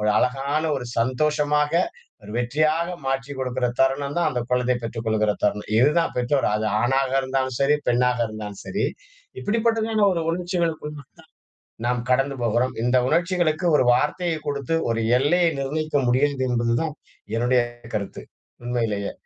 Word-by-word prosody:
ஒரு 105 - 0
அழகான 140 +5 0
ஒரு 125 -2 -5
சந்தோஷமாக, 150 +4 +1 0.5
ஒரு 105 - -11
வெற்றியாக 155 +7 +1 0.2
மாற்றிக் 135 +1 -2
கொடுக்குற 125 -1 -1
தருணம் 140 +3 +1
தான், 165 -2 +2
அந்த 125 -2 -2
குழந்தைய 125 0 +2
பெற்றுக் 115 0 -5
கொள்கிற 110 -1 +2
தருணம். 105 0 0
இது 135 +5 +5
தான் 165 - -2
பெற்றோர், 130 +3 +1
அது 110 0 -1 0.2
ஆணாக 135 +2 +1
இருந்தாலும் 130 -1 -1
சரி, 145 +2 +4
பெண்ணாக 125 0 +2
இருந்தாலும் 105 -2 -7
சரி, 200 - -1 0.5
இப்படிப்பட்டதான 225 -1 +1
ஒரு 165 -2 -1
உணர்ச்சிகளுக்கு 170 -3 -2 1.0
நாம் 125 -1 0
கடந்து 135 +2 +2
போகிறோம். 120 +3 +1
இந்த 125 +1 +3
உணர்ச்சிகளுக்கு 175 0 +1
ஒரு 130 - +3
வார்த்தையை 160 +5 0
கொடுத்து 140 +2 -2 0.2
ஒரு 115 - 0 0.2
எல்லையை 170 +5 +3
நிர்ணயிக்க 150 +2 -1
முடியாது 130 +1 +2
என்பது 120 -1 +1
தான் 160 -2 -3 0.4
என்னுடைய 125 +1 +3 0.3
கருத்து 100 -2 -4 0.4
உண்மையிலயே. 115 -5 -1
135 Hz, 140 wpm, -23 LUFS, 120-155 Hz, 1.0 s, இது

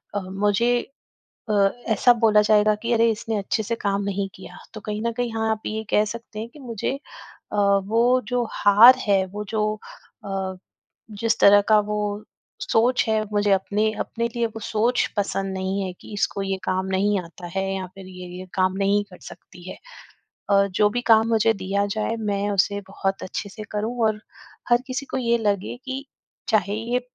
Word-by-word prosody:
अ, - - +1
मुझे 205 +4 0 0.8
अ, - - +1 0.4
ऐसा 245 +4 +5
बोला 220 -3 +4
जाएगा 210 0 +4
कि, 230 +3 -4
"अरे! 230 0 +4
इसने 220 0 -3
अच्छे 220 +3 -1
से 230 +3 -2
काम 200 -2 -1
नहीं 200 0 -2
किया।" 190 - -12 0.2
तो 215 - -8
कहीं 210 0 -3
न - - 0
कहीं, 245 -1 -1
हाँ, 220 0 0
आप 220 -1 -2
ये 220 +1 -3
कह 210 - +4
सकते 225 0 -7
हैं 225 +2 -5
कि 295 - -16
मुझे 235 -5 -3 0.6
अ, - - -2 0.3
वो 235 +5 +3
जो 245 -1 0
हार 220 +5 +7
है, 195 -2 +4
वो 205 +3 -6
जो 215 -1 0 0.6
अ, 190 -1 -3 0.6
जिस 230 -1 +1
तरह 205 0 +8
का 215 -1 +6
वो 210 0 -1 0.6
सोच 245 +3 +2
है, 220 -1 +2
मुझे 205 0 +1
अपने 205 +3 +1
अपने 235 0 -2
लिए 235 -1 +1
वो 225 0 -8
सोच 230 +4 +1
पसंद 195 -1 -1
नहीं 190 +1 -2
है 185 - -4
कि, 180 - -14
"इसको 200 0 -1
ये 195 0 -1
काम 185 0 -1
नहीं 205 +1 +2
आता 175 0 -11
है 190 - +1
या 190 -1 -4
फिर 195 -1 -11
ये, 180 -1 -9
ये 185 - -8
काम 185 -1 +1
नहीं 200 +1 +2
कर 180 - -13
सकती 180 0 -13
है।" - - -8 0.7
अ, 200 0 +5
जो 205 +2 +2
भी 245 +4 -2
काम 220 0 +6
मुझे 225 0 +3
दिया 200 0 -1
जाए, 215 +1 -1
मैं 205 -1 -1
उसे 200 +1 +1
बहुत 195 0 -2
अच्छे 200 +2 -5
से 215 +2 -9
करूँ 220 +4 -3
और 215 -1 -2 0.5
हर 240 0 +4
किसी 265 +1 -4
को - - -1
ये 235 -2 +2
लगे 205 -3 -1
कि, 265 +1 -5 0.4
"चाहे, 205 -3 +2
ये 235 +3 -1
210 Hz, 190 wpm, -23 LUFS, 195-225 Hz, 0.8 s, तरह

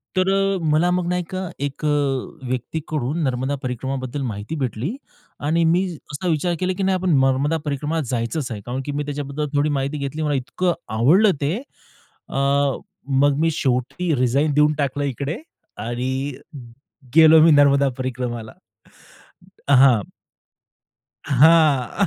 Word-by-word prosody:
तर 185 0 +2
अ, 195 0 +1
मला 165 +4 +3
मग 180 -1 0
ना 180 - 0
एका 185 +1 -4 0.2
एक 140 +1 -7 0.7
व्यक्तीकडून 150 +3 -3
नर्मदा 130 +1 -1
परिक्रमाबद्दल 130 +2 -4
माहिती 110 +4 -5
भेटली 135 - -3 0.5
आणि 165 +2 +2
मी 175 +4 +3 0.3
असा 145 +5 -4
विचार 170 +2 0
केला 185 0 0
की 195 - -1
नाही 190 0 +2
आपण 180 -5 +1
नर्मदा 135 +4 +2
परिक्रमाला 150 +3 -2
जायचंच 125 +3 -2
आहे. 105 -2 -5
कारण 125 +2 -3
की 145 - -3
मी 145 +1 -2
त्याच्याबद्दल 145 +1 -4
थोडी 145 +1 +2
माहिती 140 +1 -2
घेतली, 140 +2 -4
मला 150 -2 0
इतकं 175 +7 -1 0.2
आवडलं 185 - +5
ते. 150 +6 0 0.7
अ, - - -8 0.9
मग 145 -1 +4
मी 165 +1 +2
शेवटी 140 +5 -1
रिझाइन 135 +4 +1
देऊन 150 +1 +4
टाकलं 145 0 -1
इकडे 140 - -3 0.5
आणि 125 +2 -2 1.0
गेलो 160 -1 +8
मी 165 - +6
नर्मदा 140 -1 +5
परिक्रमाला 120 -3 -4 1.2
हां. 130 -5 +6 1.3
हां. 150 - +4
145 Hz, 135 wpm, -21 LUFS, 130-165 Hz, 1.3 s, गेलो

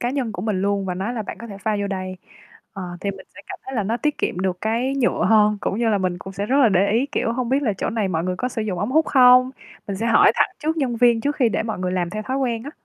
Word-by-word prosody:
cá 240 - -1
nhân 255 -5 -2
của 180 - -6
mình 205 -3 -1
luôn 200 -1 0
và 180 - -2
nói 195 +7 -3
là 225 - -3
"Bạn - - -8
có 235 - -8
thể 200 -3 -9
pha 210 +2 -1
vô 200 - -1
đây." 185 -1 -4 0.6
Ờ, 195 -2 -7 0.2
thì 200 - -1
mình 195 -1 -11
sẽ - - -11
cảm - - -7
thấy 265 - -6
là 220 - 0
nó 220 +4 -1
tiết 300 +4 -1
kiệm - - -2
được 185 -1 -1
cái 235 +5 0
nhựa 255 -3 +1
hơn, 210 -1 +4
cũng 200 - -2
như 235 -1 +1
là 210 -2 +2
mình 185 -2 -2
cũng 190 +1 -9
sẽ 200 +1 -3
rất 265 - +1
là 260 -5 +6
để 195 0 +2
ý, 240 +5 +2
kiểu, 230 - 0
hông 245 0 -2
biết 270 +3 +1
là 225 -6 +1
chỗ - - -1
này 220 -3 -1
mọi 165 -2 -1
người 185 0 -2
có 250 - -2
sử 230 -3 -4
dụng 200 -4 -3
ống 205 +6 -2
hút 315 +3 +3
không? 255 -1 +6 0.4
Mình 200 - -3
sẽ 225 - -2
hỏi 230 - +5
thẳng - - +3
trước 315 +2 -2
nhân 260 -6 -1
viên 235 -1 +4
trước 290 +5 -1
khi 250 -4 +3
để 220 - -1
mọi 220 -3 -4
người 180 0 -2
làm 175 -2 -1
theo 215 +2 -4
thói 260 +4 -3
quen 240 -4 -1
á. 285 - -7
220 Hz, 320 wpm, -22 LUFS, 195-250 Hz, 0.6 s, là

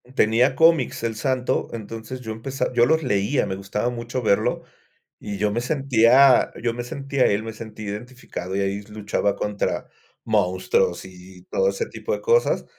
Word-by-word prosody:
Tenía 120 +4 +3
cómics, 160 -8 +3
El 115 -1 -1
Santo, 125 +3 -1
entonces 115 +3 -7
yo 110 -3 -6
empeza 130 +5 -3
yo 120 0 +4
los 160 +1 +2
leía, 105 +2 +1
me 95 -2 -3
gustaba 100 +5 -2
mucho 120 +1 -4
verlo. 100 -2 +1 0.6
Y 105 -1 -5
yo 105 +1 +1
me 115 +3 -1
sentía 130 -1 +4
yo 120 -1 0
me 120 +1 -5
sentía 135 +1 -1
él 100 +2 0
me 115 0 -6
sentía 110 -1 -8
identificado, 105 -5 -7
y 100 - 0
ahí 100 +1 -1
luchaba 105 -1 -2
contra 105 -1 -2 0.4
monstruos 90 -3 +1
y 90 0 -14
todo 485 - +2
ese 470 -1 -2
tipo 470 - -4
de - - -3
cosas. 475 0 +2
115 Hz, 170 wpm, -23 LUFS, 105-130 Hz, 0.6 s, yo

